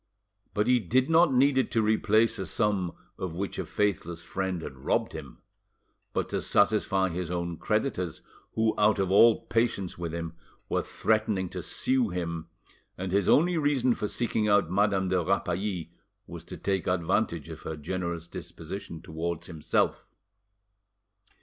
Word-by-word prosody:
But 105 Hz, -, +2 dB
he 125 Hz, 0 st, +4 dB
did 125 Hz, -, +1 dB
not 165 Hz, -1 st, +6 dB
need 135 Hz, +1 st, +4 dB
it 130 Hz, -, +1 dB
to 115 Hz, -, +3 dB
replace 110 Hz, +1 st, +3 dB
a 95 Hz, -, -2 dB
sum 100 Hz, -5 st, 0 dB, 0.3 s
of 90 Hz, -3 st, -4 dB
which 100 Hz, +3 st, -3 dB
a -, -, -2 dB
faithless 85 Hz, -5 st, -1 dB
friend 95 Hz, -1 st, -3 dB
had -, -, -7 dB
robbed -, -, 0 dB
him, -, -, -9 dB, 0.7 s
but -, -, -2 dB
to -, -, -1 dB
satisfy 100 Hz, -2 st, +2 dB
his 90 Hz, 0 st, -4 dB
own 85 Hz, -1 st, -2 dB
creditors, 90 Hz, -, -1 dB, 0.3 s
who, 110 Hz, 0 st, +2 dB
out 105 Hz, 0 st, +4 dB
of 95 Hz, -2 st, 0 dB
all 115 Hz, +3 st, +6 dB
patience 115 Hz, -7 st, 0 dB
with 85 Hz, -2 st, -3 dB
him, 85 Hz, -1 st, -4 dB, 0.4 s
were -, -, +1 dB
threatening 110 Hz, -4 st, 0 dB
to -, -, -5 dB
sue 130 Hz, -3 st, 0 dB
him, 85 Hz, -2 st, -4 dB, 0.5 s
and 95 Hz, 0 st, -4 dB
his 100 Hz, 0 st, +2 dB
only 170 Hz, +2 st, +4 dB
reason 135 Hz, -4 st, +2 dB
for 105 Hz, -, -3 dB
seeking 110 Hz, -1 st, 0 dB
out 100 Hz, -5 st, +3 dB
Madame 95 Hz, -1 st, +2 dB
de 90 Hz, -2 st, +2 dB
Rapally 90 Hz, -2 st, -1 dB, 0.3 s
was -, -, -9 dB
to -, -, -8 dB
take 95 Hz, -2 st, -1 dB
advantage 90 Hz, -2 st, 0 dB
of -, -, -8 dB
her 80 Hz, -, -5 dB
generous 85 Hz, +1 st, -3 dB
disposition 85 Hz, 0 st, -8 dB
towards 85 Hz, +1 st, -4 dB
himself. 80 Hz, -4 st, -1 dB
95 Hz, 155 wpm, -28 LUFS, 85-110 Hz, 0.7 s, not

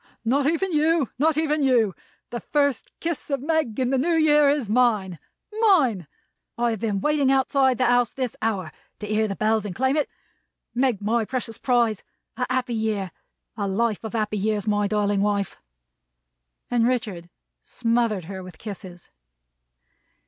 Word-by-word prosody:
"Not 275 Hz, +4 st, +2 dB
even 340 Hz, +4 st, 0 dB
you. 310 Hz, -3 st, +2 dB
Not 310 Hz, +1 st, +2 dB
even 310 Hz, -1 st, +1 dB
you. 240 Hz, -7 st, +3 dB, 0.4 s
The 240 Hz, -, -3 dB
first 285 Hz, -2 st, 0 dB
kiss 330 Hz, -3 st, -4 dB
of 275 Hz, -1 st, 0 dB
Meg 305 Hz, -7 st, 0 dB
in 255 Hz, 0 st, +1 dB
the 265 Hz, -, +2 dB
New 335 Hz, +5 st, +1 dB
Year 300 Hz, -2 st, +5 dB
is 280 Hz, -5 st, 0 dB
mine. 210 Hz, -6 st, +1 dB, 0.4 s
Mine! 275 Hz, -, +3 dB, 0.5 s
I 240 Hz, 0 st, +1 dB
have 220 Hz, -, -3 dB
been 205 Hz, -3 st, -1 dB
waiting 295 Hz, -1 st, +2 dB
outside 265 Hz, -1 st, +3 dB
the 255 Hz, -, +2 dB
house 245 Hz, -1 st, +3 dB
this 255 Hz, -3 st, -3 dB
hour 195 Hz, -7 st, -1 dB, 0.3 s
to 210 Hz, -, -7 dB
hear 215 Hz, +1 st, +1 dB
the 195 Hz, -, -3 dB
Bells 215 Hz, 0 st, +1 dB
and 200 Hz, -4 st, -5 dB
claim 265 Hz, +2 st, +1 dB
it. 300 Hz, -, 0 dB, 0.6 s
Meg, 245 Hz, -5 st, 0 dB
my 225 Hz, +2 st, +1 dB
precious 230 Hz, -1 st, -4 dB
prize, 235 Hz, -5 st, +1 dB, 0.3 s
a 250 Hz, +1 st, -2 dB
happy 255 Hz, -1 st, 0 dB
year! 215 Hz, -4 st, -1 dB, 0.4 s
A 205 Hz, -2 st, -2 dB
life 215 Hz, +2 st, 0 dB
of 220 Hz, -, -6 dB
happy 215 Hz, -2 st, -1 dB
years, 210 Hz, 0 st, -1 dB
my 205 Hz, -1 st, +1 dB
darling 205 Hz, -1 st, +1 dB
wife!" 200 Hz, -1 st, -1 dB, 1.1 s
And 235 Hz, -1 st, +3 dB
Richard 210 Hz, -9 st, -2 dB, 0.3 s
smothered 230 Hz, -6 st, 0 dB
her 190 Hz, +1 st, -7 dB
with 180 Hz, -3 st, -11 dB
kisses. 185 Hz, -4 st, -9 dB
235 Hz, 165 wpm, -24 LUFS, 210-270 Hz, 1.1 s, Year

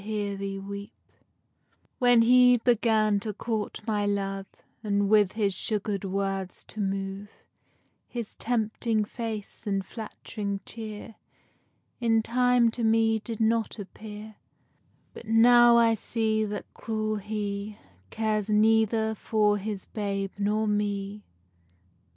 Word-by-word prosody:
_ 200 Hz, -1 st, -4 dB, 1.1 s
When 245 Hz, -2 st, +5 dB
he 250 Hz, +1 st, +6 dB
began 220 Hz, -3 st, +2 dB
to 210 Hz, +1 st, -4 dB
court 215 Hz, 0 st, -3 dB
my 210 Hz, -2 st, 0 dB
love, 195 Hz, -1 st, -2 dB, 0.4 s
And 200 Hz, -1 st, +1 dB
with 210 Hz, -3 st, +4 dB
his 205 Hz, -3 st, 0 dB
sugar'd 205 Hz, +1 st, -2 dB
words 195 Hz, -1 st, -3 dB
to 215 Hz, -, -9 dB
move, 195 Hz, +1 st, -3 dB, 0.8 s
His 235 Hz, -3 st, -6 dB
tempting 220 Hz, -1 st, 0 dB
face, 220 Hz, -2 st, -6 dB
and 195 Hz, -1 st, 0 dB
flatt'ring 205 Hz, -2 st, -6 dB
chear, 220 Hz, -1 st, -8 dB, 0.8 s
In 225 Hz, -2 st, +2 dB
time 245 Hz, 0 st, +3 dB
to 235 Hz, +1 st, -4 dB
me 225 Hz, 0 st, +3 dB
did 220 Hz, +1 st, -6 dB
not 225 Hz, 0 st, +1 dB
appear; 210 Hz, +1 st, -9 dB, 0.8 s
But 230 Hz, -, -11 dB
now 240 Hz, +1 st, +7 dB
I 230 Hz, -1 st, +5 dB
see 220 Hz, 0 st, 0 dB
that 205 Hz, 0 st, -6 dB
cruel 215 Hz, -1 st, -2 dB
he 205 Hz, 0 st, -4 dB, 0.3 s
Cares 215 Hz, -1 st, -1 dB
neither 220 Hz, +1 st, +3 dB
for 210 Hz, -1 st, +1 dB
his 200 Hz, -1 st, -5 dB
babe 195 Hz, -2 st, -3 dB
nor 210 Hz, +2 st, +1 dB
me. 205 Hz, 0 st, -2 dB
215 Hz, 115 wpm, -27 LUFS, 200-225 Hz, 1.1 s, now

